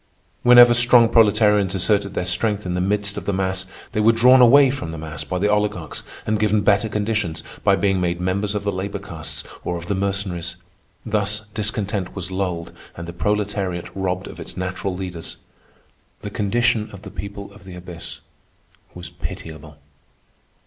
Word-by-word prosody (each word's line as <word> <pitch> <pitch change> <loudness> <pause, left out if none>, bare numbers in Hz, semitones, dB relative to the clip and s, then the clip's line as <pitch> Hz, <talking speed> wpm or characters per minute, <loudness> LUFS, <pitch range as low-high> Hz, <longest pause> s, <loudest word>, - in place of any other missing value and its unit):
Whenever 120 0 +8
strong 120 0 +6
proletarians 105 -3 +4
asserted 100 +1 +1
their 90 - -1
strength 105 +3 0
in 90 - -2
the 90 - -1
midst 100 +1 -1
of - - -5
the - - 0
mass, 95 0 -1 0.2
they - - -2
were 110 +2 +5
drawn 125 +3 +6
away 135 +2 +7
from 110 -12 -5
the 80 - -7
mass 75 -2 -6
by 85 +5 -3
the 100 +3 +1
oligarchs 105 -5 -1 0.2
and 110 0 0
given 105 0 +2
better 100 +2 +2
conditions 105 -5 -2 0.2
by - - +4
being 95 -2 +1
made 85 -1 -1
members 100 +3 -1
of 105 - -2
the 100 - 0
labor 95 +1 -4
castes - - -7 0.2
or 90 - -2
of 85 - -8
the 100 - -1
Mercenaries. 95 -2 -2 0.5
Thus 105 -1 0
discontent 105 -3 -2
was 95 -2 -6
lulled 90 -3 -3 0.3
and 85 0 -7
the 85 - -7
proletariat 100 -2 -2
robbed 95 -1 -2
of - - -10
its - - -7
natural 90 +1 -3
leaders. 90 -3 -7 0.8
The 105 - -6
condition 110 +2 +1
of 100 0 -12
the - - -9
people 100 0 -8
of 105 - -16
the 95 -2 -10
abyss 90 -1 -9 0.7
was 90 -1 -8
pitiable. 80 -3 -8
100 Hz, 175 wpm, -21 LUFS, 90-105 Hz, 0.8 s, Whenever